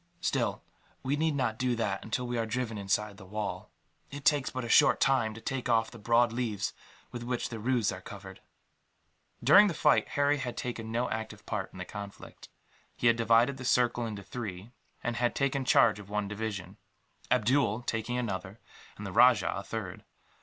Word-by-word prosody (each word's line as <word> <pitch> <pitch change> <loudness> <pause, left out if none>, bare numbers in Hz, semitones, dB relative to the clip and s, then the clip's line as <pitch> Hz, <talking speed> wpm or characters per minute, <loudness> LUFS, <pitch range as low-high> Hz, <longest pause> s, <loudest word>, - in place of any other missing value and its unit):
Still, - - -1 0.4
we 135 +2 0
need 155 0 +1
not 120 -5 -1
do 125 -1 +1
that 105 -4 -2
until 125 +3 -2
we 120 0 -3
are 115 -1 -1
driven 115 0 -2
inside 100 0 -1
the 95 - -12
wall. 105 +2 -4 0.4
It 140 0 -9
takes 145 -3 +3
but 130 -1 -4
a - - -4
short - - +5
time 115 -5 +2
to 110 - -10
take 130 0 -3
off 115 -1 +2
the 115 - -11
broad 115 +2 +3
leaves 110 -4 -2 0.4
with 120 - -6
which 120 0 -2
the 115 - -6
roofs 120 -1 +1
are - - -7
covered." - - -10 1.0
During 190 - +8
the 175 - -2
fight, 150 - +3
Harry 145 +1 +2
had 125 -3 -4
taken 115 -2 -4
no 120 +2 0
active 110 -1 -5
part 100 -3 -3
in - - -13
the 90 - -5
conflict. 100 0 -10 0.5
He - - -4
had 115 -1 +6
divided 115 +4 +3
the 130 - -8
circle 120 -1 +2
into 105 -3 -6
three, 105 -2 -7 0.3
and 120 0 -2
had 120 0 +1
taken 135 -1 0
charge 105 -4 +4
of 100 -1 -11
one 105 -1 -1
division, 105 -2 -5 0.5
Abdool 125 -1 +2
taking 115 +1 -2
another, 100 -3 -4 0.4
and 105 - -7
the 100 - -5
rajah 120 +2 +5
a 100 - -3
third. 100 -3 -6
115 Hz, 190 wpm, -30 LUFS, 105-125 Hz, 1.0 s, During